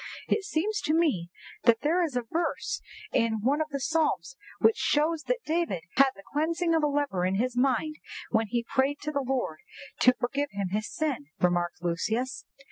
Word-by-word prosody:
"It 415 Hz, -, +1 dB
seems 420 Hz, +3 st, -1 dB
to 305 Hz, -, +1 dB
me 270 Hz, -, +1 dB, 0.4 s
that 235 Hz, -2 st, +5 dB
there 335 Hz, +5 st, +2 dB
is 305 Hz, -6 st, -2 dB
a 245 Hz, -, 0 dB
verse 340 Hz, -, -2 dB, 0.3 s
in 225 Hz, -2 st, +2 dB
one 280 Hz, +7 st, +2 dB
of 310 Hz, -, -2 dB
the 280 Hz, -1 st, -3 dB
Psalms 320 Hz, -, 0 dB, 0.2 s
which 445 Hz, -, +4 dB
shows 310 Hz, +1 st, +1 dB
that -, -, 0 dB
David 315 Hz, -, -1 dB
had 275 Hz, 0 st, +6 dB
the 195 Hz, -, -14 dB
cleansing 330 Hz, +3 st, +1 dB
of 325 Hz, -, +3 dB
a 300 Hz, -, +3 dB
leper 285 Hz, -11 st, 0 dB
in 185 Hz, +1 st, +1 dB
his 245 Hz, +4 st, 0 dB
mind 275 Hz, +5 st, +1 dB, 0.3 s
when 220 Hz, -1 st, +2 dB
he 235 Hz, +2 st, -1 dB
prayed 275 Hz, +2 st, +1 dB
to 300 Hz, -, -3 dB
the 280 Hz, -1 st, 0 dB
Lord 250 Hz, -12 st, -2 dB, 0.4 s
to 250 Hz, 0 st, +6 dB
forgive 280 Hz, +4 st, -1 dB
him 200 Hz, -2 st, -2 dB
his 215 Hz, +3 st, -2 dB
sin," 285 Hz, -, -2 dB
remarked 175 Hz, -1 st, +1 dB
Lucius. 220 Hz, +9 st, -1 dB
275 Hz, 190 wpm, -28 LUFS, 225-315 Hz, 0.4 s, had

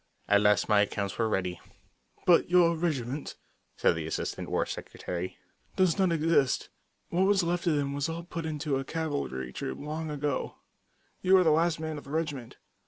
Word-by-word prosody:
At 100 Hz, 0 st, +5 dB
last 105 Hz, 0 st, +3 dB
my 105 Hz, -1 st, +5 dB
accounts 100 Hz, 0 st, -2 dB
were 115 Hz, -1 st, +2 dB
ready. 90 Hz, -4 st, -2 dB, 0.6 s
"But 175 Hz, -2 st, +5 dB
your 175 Hz, -1 st, +5 dB
regiment," 145 Hz, -5 st, -2 dB, 0.4 s
said -, -, +4 dB
the 80 Hz, -1 st, -4 dB
Assistant -, -, -3 dB
War -, -, +1 dB
Secretary, 90 Hz, +1 st, -5 dB, 0.4 s
"does 185 Hz, -1 st, +2 dB
not 190 Hz, -2 st, +3 dB
exist. 160 Hz, -5 st, +2 dB, 0.4 s
What 185 Hz, +3 st, +2 dB
was 200 Hz, -2 st, +3 dB
left 175 Hz, +1 st, -1 dB
of 160 Hz, -, +3 dB
them 140 Hz, -1 st, -1 dB
were 145 Hz, -, -4 dB
all 165 Hz, +1 st, -4 dB
put 170 Hz, -1 st, -5 dB
into 150 Hz, -2 st, -1 dB
a 135 Hz, -, -2 dB
cavalry 135 Hz, -, -3 dB
troop 65 Hz, -, -4 dB
long 155 Hz, +2 st, -4 dB
ago. 145 Hz, -2 st, -2 dB, 0.7 s
_You 190 Hz, 0 st, +6 dB
are -, -, +4 dB
the 160 Hz, -, +4 dB
last 165 Hz, +1 st, +2 dB
man 160 Hz, -1 st, -4 dB
of -, -, -15 dB
the -, -, -12 dB
regiment. 145 Hz, -6 st, -3 dB
150 Hz, 180 wpm, -29 LUFS, 115-170 Hz, 0.7 s, You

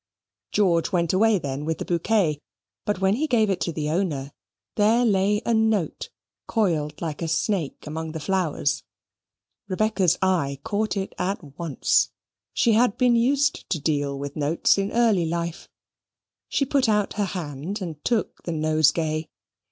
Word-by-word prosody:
George 175 Hz, -5 st, +2 dB
went 170 Hz, -3 st, +1 dB
away 215 Hz, +2 st, +4 dB
then 140 Hz, -3 st, -4 dB
with 160 Hz, +1 st, -2 dB
the -, -, -5 dB
bouquet; 170 Hz, -3 st, +1 dB, 0.5 s
but 205 Hz, -3 st, -1 dB
when 195 Hz, +3 st, +3 dB
he 310 Hz, +3 st, 0 dB
gave 220 Hz, -6 st, +3 dB
it 190 Hz, -, -2 dB
to 170 Hz, -, 0 dB
the 155 Hz, -2 st, -3 dB
owner, 155 Hz, -6 st, -1 dB, 0.4 s
there 225 Hz, +4 st, +3 dB
lay 205 Hz, 0 st, +2 dB
a 235 Hz, -, +1 dB
note, 220 Hz, -5 st, 0 dB, 0.4 s
coiled 160 Hz, -, 0 dB
like 155 Hz, -2 st, -4 dB
a 165 Hz, -, -1 dB
snake 165 Hz, -1 st, -1 dB
among 160 Hz, +1 st, -5 dB
the 160 Hz, -, -4 dB
flowers. 165 Hz, -3 st, 0 dB, 0.9 s
Rebecca's 195 Hz, -2 st, +1 dB
eye 165 Hz, -8 st, +1 dB
caught 215 Hz, -1 st, -1 dB
it 195 Hz, 0 st, -3 dB
at 180 Hz, -7 st, -4 dB
once. 165 Hz, -5 st, +2 dB, 0.4 s
She 235 Hz, -, +2 dB
had 225 Hz, -1 st, +3 dB
been 245 Hz, -1 st, +4 dB
used 275 Hz, +5 st, +1 dB
to 165 Hz, -, 0 dB
deal 145 Hz, -2 st, -1 dB
with 140 Hz, +1 st, -6 dB
notes 150 Hz, +2 st, +2 dB
in 195 Hz, +1 st, -1 dB
early 220 Hz, -8 st, +3 dB
life. 170 Hz, 0 st, -4 dB, 0.8 s
She 275 Hz, -, +1 dB
put 270 Hz, -3 st, +2 dB
out 210 Hz, -2 st, +1 dB
her 205 Hz, 0 st, 0 dB
hand 175 Hz, 0 st, -5 dB
and 165 Hz, -6 st, -6 dB
took 235 Hz, -3 st, -1 dB
the 170 Hz, -, -4 dB
nosegay. 155 Hz, 0 st, +1 dB
180 Hz, 160 wpm, -24 LUFS, 155-215 Hz, 0.9 s, away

